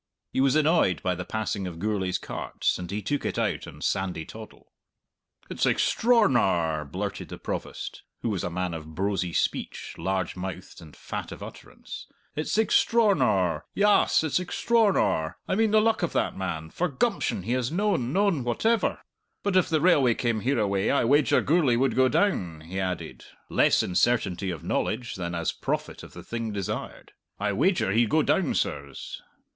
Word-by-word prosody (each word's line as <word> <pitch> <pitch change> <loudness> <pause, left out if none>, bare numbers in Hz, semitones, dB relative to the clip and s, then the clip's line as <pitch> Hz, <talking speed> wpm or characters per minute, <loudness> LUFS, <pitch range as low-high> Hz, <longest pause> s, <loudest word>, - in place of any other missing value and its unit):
He 130 - +2
was 135 +1 +3
annoyed 155 - +3
by 90 - +1
the 90 +1 -5
passing 105 -3 -2
of 85 -2 -7
Gourlay's 95 -1 -1
carts, - - -2
and 90 -1 -6
he 105 +2 -3
took 145 +8 -1
it - - -2
out - - -1
of - - -10
Sandy 95 -4 -1
Toddle. 110 -1 -12 0.8
"It's - - 0
extr'ornar!" 105 - +2
blurted - - -4
the - - -7
Provost - - -5 0.2
(who 115 - 0
was 100 -4 -2
a - - -1
man 90 0 -2
of 80 -1 -8
brosy 95 -1 -1
speech, - - -2
large 95 +1 -1
mouthed 90 0 -7
and 80 -3 -13
fat - - -6
of - - -8
utterance). - - -10 0.3
"It's 155 +7 -1
extr'ornar. 190 - +3
Yass, 205 -5 +4
it's 160 +2 +1
extr'ornar! 185 - +1
I - - 0
mean 220 +3 +3
the 215 +1 +5
luck 220 0 +2
of 175 - -1
that - - 0
man 80 -4 -4
for 180 - 0
gumption 165 - -1
he 115 - -3
has 125 0 0
noan, 180 - 0
noan 195 -6 +2
whatever! 220 - +1 0.4
But 200 -2 0
if 185 - +4
the 155 -2 +2
railway 140 -9 +4
came 120 -4 0
hereaway 105 -5 +1
I 140 - +2
wager 145 +4 +4
Gourlay 150 -5 +3
would 130 +3 +1
go 130 0 +5
down," 95 - 0
he 90 +4 -5
added, 90 -2 -4 0.2
less - - +3
in 90 - -4
certainty 100 -3 +1
of 85 -5 -5
knowledge 120 +1 -1
than 85 -2 -4
as 85 -1 -1
prophet - - -3
of - - -12
the - - -10
thing 115 -1 -4
desired. 100 -3 -5 0.3
"I 105 0 0
wager 145 - +2
he'd 115 +2 +3
go 155 +4 +3
down, 190 - +1
sirs." - - -3
115 Hz, 175 wpm, -26 LUFS, -, 0.8 s, the